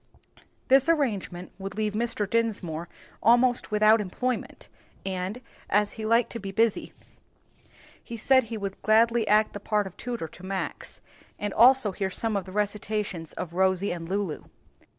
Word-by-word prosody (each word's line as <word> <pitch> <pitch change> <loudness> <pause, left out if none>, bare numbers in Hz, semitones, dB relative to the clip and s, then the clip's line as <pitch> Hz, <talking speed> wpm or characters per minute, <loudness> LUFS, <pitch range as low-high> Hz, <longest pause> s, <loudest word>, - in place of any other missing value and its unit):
This 270 +3 +5
arrangement 205 - -1
would 195 0 -6
leave 215 -1 0
Mr. 225 -2 -1
Dinsmore 190 -7 -1 0.3
almost 245 +2 +3
without 215 +1 +5
employment, 240 +6 -3 0.4
and, 190 +4 -3 0.3
as 205 +1 +2
he 220 -1 -5
liked 230 +1 +3
to 230 - -5
be 195 -1 -6
busy, 225 +1 +1 1.1
he 235 - -7
said 260 +2 +4
he 225 0 -5
would 195 -2 -5
gladly 230 +1 +3
act 215 +1 +3
the 205 - -5
part 210 0 0
of 190 - -9
tutor 240 -9 -4
to 175 +3 -16
Max, 190 0 -4 0.4
and 205 -1 -3
also 250 -2 +5
hear 190 0 -2
some 215 +3 -2
of 195 -2 -1
the 185 - -10
recitations 205 -4 -2
of 175 -2 -6
Rosie 190 +1 +1
and 170 -1 -5
Lulu. 195 -5 -2
210 Hz, 155 wpm, -27 LUFS, 190-230 Hz, 1.1 s, This